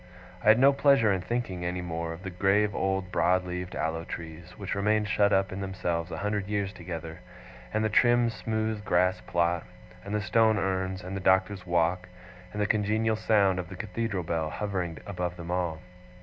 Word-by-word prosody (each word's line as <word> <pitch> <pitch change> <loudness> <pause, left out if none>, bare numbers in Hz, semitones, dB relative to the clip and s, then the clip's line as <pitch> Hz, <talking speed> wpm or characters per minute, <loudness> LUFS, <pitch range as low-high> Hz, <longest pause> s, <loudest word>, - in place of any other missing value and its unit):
I - - -10
had 110 +1 +8
no 135 +2 +6
pleasure 135 -6 +4
in 95 - -1
thinking, 100 -5 -3
any 90 +1 -2
more, 85 -1 -3
of 85 +2 -8
the 95 - -5
grave 100 +3 +2
old 95 -2 -1
broad 90 +1 +2
leaved 90 0 -5
aloe 80 +1 -2
trees, 85 +2 -8
which 100 -2 -4
remained 105 +1 +1
shut 100 +2 +3
up 95 -1 +2
in 95 +1 -5
themselves 90 -3 -2
a - - -5
hundred 105 -1 -2
years 100 -1 -1
together, 85 -2 -7 0.5
and 110 0 0
of 110 - 0
the - - -5
trim 120 -1 +4
smooth 110 -1 -2
grass 90 -1 +2
plot, 85 0 +1 0.4
and 100 +1 -4
the - - +1
stone 110 +1 +3
urns, 95 -1 -1
and 95 +2 -5
the - - -2
Doctor's 95 0 +2
walk, 85 +1 +1 0.4
and 105 - -6
the 105 - +2
congenial 110 +1 +1
sound 100 -4 +2
of 90 -1 -5
the 95 - -8
Cathedral 105 -1 -3
bell 80 -1 -1
hovering 90 -4 -3
above 90 -3 -4
them 85 0 -6
all. 85 -3 -1
95 Hz, 195 wpm, -28 LUFS, 90-105 Hz, 0.5 s, had